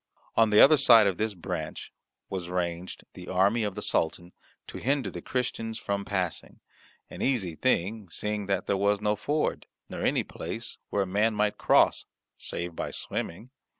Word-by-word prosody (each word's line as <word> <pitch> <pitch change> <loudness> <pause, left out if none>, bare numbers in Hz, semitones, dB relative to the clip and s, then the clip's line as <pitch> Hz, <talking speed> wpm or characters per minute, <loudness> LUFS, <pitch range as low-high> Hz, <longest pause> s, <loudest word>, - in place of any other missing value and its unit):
On 115 -1 +5
the 105 0 +5
other 155 +2 +8
side 115 -5 +7
of 95 -3 +1
this 110 -1 -1
branch 85 - -5 0.3
was 90 -3 -5
ranged 90 0 -3
the 90 - -10
army 100 +5 +2
of 105 -2 -2
the - - -5
Sultan, 85 +2 -1 0.3
to - - -8
hinder 140 +1 0
the - - -7
Christians 115 -3 -3
from 100 -2 -3
passing, 90 -6 -3 0.5
an - - -8
easy 105 -11 0
thing 105 -2 0
seeing 105 +3 -2
that 100 - 0
there 100 - +1
was 100 +1 +2
no 105 0 +1
ford, 150 +8 -1 0.2
nor - - -6
any - - +2
place - - -6
where 100 - +1
a - - -4
man 105 +4 +1
might 105 0 0
cross - - +3 0.3
save 85 -1 -5
by - - -3
swimming. 110 +9 -4
100 Hz, 175 wpm, -28 LUFS, 90-110 Hz, 0.5 s, other